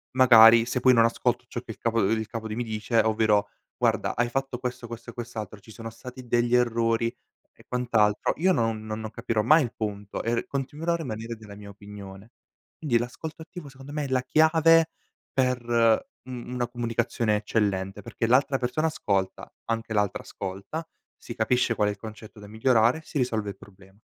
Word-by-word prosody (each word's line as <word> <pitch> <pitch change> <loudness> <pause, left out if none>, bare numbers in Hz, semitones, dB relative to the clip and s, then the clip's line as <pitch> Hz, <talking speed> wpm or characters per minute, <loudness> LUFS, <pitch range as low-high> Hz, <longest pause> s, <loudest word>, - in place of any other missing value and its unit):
magari 115 -3 +8
se 125 +1 -1
poi 130 +1 +5
non 115 -1 +5
ascolto 115 - 0
ciò - - -5
che - - -9
il - - -10
capo, 115 0 0
ehm, 95 - +2
il 110 -1 -4
capo 110 -1 -5
di 110 - -4
mi 120 - -2
dice 110 +1 -1
ovvero: 110 -2 +2 0.3
"Guarda - - +1
hai 120 0 +1
fatto 135 0 -2
questo, 125 -1 -5
questo 115 0 -8
e - - -22
quest'altro. 110 -3 -7
Ci 105 - -20
sono 115 +1 -8
stati 125 +2 -11
degli 120 +1 +2
errori 115 -1 +1 0.4
e - - -20
quant'altro" 115 -4 +1
io 185 +4 +3
non 115 -8 0
non 110 0 -4
non 110 -1 -6
capirò 110 -2 -1
mai 155 +8 +6
il 120 -1 -5
punto 105 -2 -4
e 115 - 0
r 115 - -1
continuerò 145 +5 -2
a - - +2
rimanere 115 -6 -5
della 105 -2 -12
mia 100 0 -11
opinione. 100 +1 -11 0.5
Quindi 140 -7 +1
l'ascolto 150 +7 -5
attivo 170 -3 -10
secondo 135 +1 -12
me 150 -1 -2
è - - -4
la 130 -1 +2
chiave 160 +3 +4 0.4
per 125 -2 +1 0.6
u 130 - -9
una 125 0 -4
comunicazione 120 -2 -1
eccellente 100 -2 -1
perché 115 - -3
l'altra 135 +3 +3
persona 130 +6 0
ascolta, 100 -11 -2
anche 115 -1 -3
l'altra 105 -2 0
ascolta, 100 - -6 0.3
si - - -9
capisce 115 +1 +1
qual 105 - +2
è - - 0
il 105 - -8
concetto 110 -1 -10
da 105 - -11
migliorare, 115 +5 +2
si 155 - -6
risolve 110 -5 -1
il 100 - -8
problema. 95 0 -18
115 Hz, 195 wpm, -26 LUFS, 110-125 Hz, 0.6 s, magari